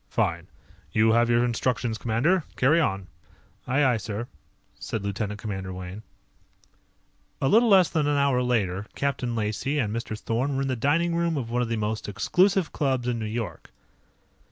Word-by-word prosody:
"Fine. - - -1 0.4
You 110 +1 +4
have 120 +1 +3
your 120 +1 +3
instructions, 120 -1 -1
commander. 135 - +1
Carry 145 +6 +4
on." 95 - 0 0.6
"Aye, 140 +4 +2
aye, 125 -3 +3
sir," 110 +2 -5 0.5
said 110 -5 -4
Lieutenant 105 +1 -3
Commander 95 -3 -5
Wayne. 95 +2 -7 1.4
A 135 - +1
little 230 - +5
less 190 -4 +6
than 155 -3 0
an 145 -1 +2
hour 140 -3 +2
later, 105 -5 0
Captain 130 -4 -1
Lacey 110 +7 -1
and 110 -6 0
Mr. 115 -2 -4
Thorn 125 +6 -1
were 135 - 0
in 135 - -2
the 130 - 0
dining 165 +8 +1
room 170 -2 0
of 115 -4 -4
one 125 +1 +1
of 120 - -1
the 115 - -1
most 110 0 -3
exclusive 180 - +2
clubs 130 -4 0
in 120 -1 -1
New 110 - -3
York. 115 +1 -5
120 Hz, 175 wpm, -26 LUFS, 110-140 Hz, 1.4 s, less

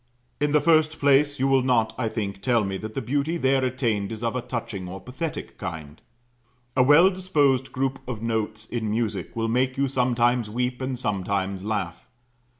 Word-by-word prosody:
In 145 0 +1
the 150 - +5
first 155 +1 +3
place 145 +1 +3
you 135 - +2
will 135 -1 +4
not, 120 -4 +2
I 115 -3 -1
think, 100 -3 -4
tell 120 -4 +2
me 95 -1 -3
that 110 +2 -7
the 135 - -2
beauty 145 +7 0
there 135 -3 +2
attained 115 -5 -1
is 110 +1 -6
of 115 +1 -1
a 125 - -1
touching 110 -6 -5
or 95 +1 -7
pathetic 145 - -6
kind. 75 -2 -7 0.7
A 130 - +4
well 150 +8 +6
disposed 145 -9 +1
group 135 +1 -1
of 125 -4 -4
notes 110 -1 -2
in 110 -2 -3
music 105 -4 -2
will 115 0 -1
make 130 +3 +1
you 140 0 +2
sometimes 125 -3 +1
weep 125 +3 -2
and 130 -1 -2
sometimes 100 -3 -2
laugh. 100 -6 -3
125 Hz, 185 wpm, -25 LUFS, 110-135 Hz, 0.7 s, well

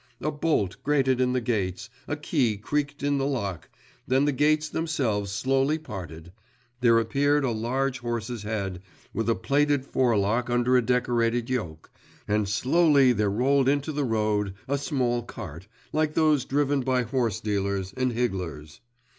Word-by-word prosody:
a 155 - -1
bolt 145 - 0
grated 135 -3 +2
in 125 0 +2
the 130 - +2
gates, 100 -7 -2 0.2
a 145 - -1
key 140 -7 0
creaked 145 +7 -2
in 145 -1 +1
the 135 - 0
lock, 100 - -3 0.4
then 135 +2 +3
the 145 - +2
gates 150 +2 +2
themselves 135 -12 -1
slowly 135 +8 +1
parted, 85 - -8 0.5
there 120 -2 +5
appeared 140 +6 +2
a 130 - +1
large 125 +4 -1
horse's 120 -1 -4
head, 100 -4 -3 0.3
with 115 +1 -1
a 115 - +3
plaited 145 -1 +1
forelock 120 -2 +1
under 120 +1 +2
a 125 - +5
decorated 120 0 0
yoke, 85 -11 -4 0.4
and 105 -1 +1
slowly 140 - +4
there 105 -3 +1
rolled 130 +5 +2
into 145 +2 0
the 145 -1 -1
road 105 -4 0
a 140 - +1
small 130 -4 0
cart, 95 -7 -9 0.3
like 155 0 0
those 155 -4 +3
driven 145 0 +1
by 130 -1 +1
horse 115 -4 -1
dealers, 100 -2 -2
and 130 0 0
higglers. 90 -11 -3
125 Hz, 155 wpm, -26 LUFS, 105-140 Hz, 0.5 s, there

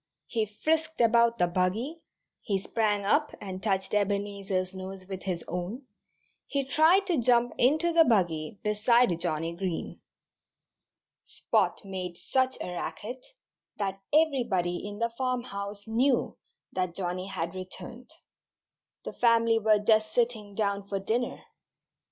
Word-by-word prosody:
He 220 -2 -1
frisked 320 +9 -1
about 235 0 +4
the 180 - +3
buggy, 190 - -1 0.4
he 200 -3 0
sprang 205 +1 0
up 295 +9 +2
and 190 -1 -6
touched 195 -2 -1
Ebenezer's 200 -2 -1
nose 190 0 -7
with 190 -1 -6
his 180 -3 -3
own, 180 - -4 0.6
he 280 -2 -1
tried 320 +8 +4
to 350 -7 +1
jump 240 0 +3
into 315 +7 +3
the 330 0 +7
buggy 175 - +1
beside 210 -2 +3
Johnnie 165 -1 -2
Green. 180 -2 -4 1.2
Spot - - 0
made 185 -3 -5
such 260 +4 0
a 180 - -4
racket 235 +7 -5 0.5
that 195 -1 -3
everybody 240 - +2
in 205 0 -7
the 230 +1 0
farmhouse 210 -6 -3
knew 245 +3 +2 0.4
that 185 -2 -2
Johnnie 185 0 -2
had 170 -3 -3
returned. 230 +7 -8 1.0
The - - -5
family 230 -1 +4
were 215 -1 +4
just 215 +1 +3
sitting 225 -4 0
down 200 -2 -1
for 200 -1 -2
dinner. 230 +5 -2
210 Hz, 130 wpm, -28 LUFS, 190-245 Hz, 1.2 s, the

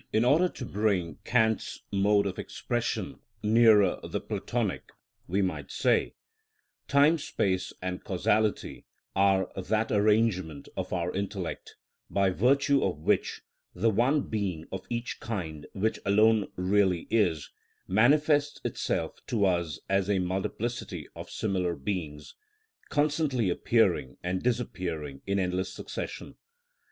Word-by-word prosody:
In 110 +2 +2
order 165 +8 +4
to 130 - -7
bring 100 -6 -1
Kant's 110 -3 +1
mode 100 +1 +3
of 95 -2 -3
expression 120 +3 -3 0.2
nearer 110 -2 +5
the - - -3
Platonic, - - -3 0.4
we 95 +3 +1
might 95 - -3
say: - - +1 0.7
Time, 145 +4 +4
space, 95 -9 -1
and 90 0 -4
causality 105 +3 0 0.3
are 95 -1 +3
that 110 +4 -1
arrangement 105 -8 +1
of - - -4
our 90 -1 -1
intellect 95 -2 -4 0.3
by 100 -1 +2
virtue 135 +7 +3
of 95 -5 0
which 75 - 0 0.3
the 115 - +2
one 130 +8 +2
being 95 -7 -3
of 95 -1 -6
each 120 0 -3
kind 80 -9 -5
which 110 +3 -1
alone 105 +1 +3
really 95 -2 +2
is, 90 -9 +1 0.4
manifests 145 +7 +3
itself - - -2
to 105 -4 +1
us 85 -5 0
as 95 0 +1
a 100 - +3
multiplicity 95 - -3
of - - -8
similar 90 -5 -1
beings, 75 -1 -5 0.6
constantly 145 - +1
appearing 65 -6 +1
and 90 +1 -1
disappearing 90 - -3
in 100 0 +1
endless 90 0 -1
succession. - - -7
100 Hz, 125 wpm, -28 LUFS, 90-115 Hz, 0.7 s, nearer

